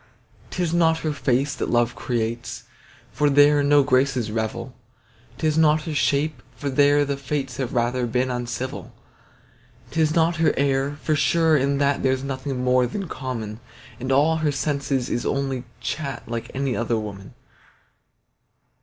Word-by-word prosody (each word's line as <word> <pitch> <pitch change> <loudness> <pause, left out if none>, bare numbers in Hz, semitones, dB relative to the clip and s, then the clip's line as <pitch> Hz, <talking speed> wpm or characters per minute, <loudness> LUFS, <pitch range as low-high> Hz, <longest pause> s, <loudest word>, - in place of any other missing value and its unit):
'Tis 175 -3 -2
not 165 -1 +3
her 155 -2 -1
face 135 0 0
that - - -3
love 120 0 +2
creates, 115 -1 -3 0.5
For 150 -1 +2
there 145 +1 +5
no 145 0 +5
graces 130 -4 +1
revel; 115 +3 -3 0.6
'Tis 155 0 +1
not 155 -1 +4
her 160 - -4
shape, 145 -1 0
for 140 +4 -3
there 145 +2 +4
the 140 0 -1
fates 135 -2 -3
Have 130 -3 -3
rather 120 +1 +1
been 125 +2 0
uncivil. 125 +1 -5 1.0
'Tis 155 -1 +1
not 165 0 +2
her 160 0 +2
air, 140 +1 +1
for 155 - +1
sure 160 +1 +3
in 140 0 +1
that 140 0 +1
There's 130 0 +1
nothing 130 -1 -3
more 125 0 +3
than 195 - -4
common; 115 -7 -5 0.4
And 130 +2 -3
all 150 +4 +4
her 155 -2 +1
sense 140 0 -2
is 125 -2 0
only 135 -2 -2 0.2
chat 140 -4 -4
Like 115 0 -4
any 135 -2 -1
other 115 0 0
woman. 100 -3 -7
135 Hz, 155 wpm, -23 LUFS, 125-150 Hz, 1.0 s, there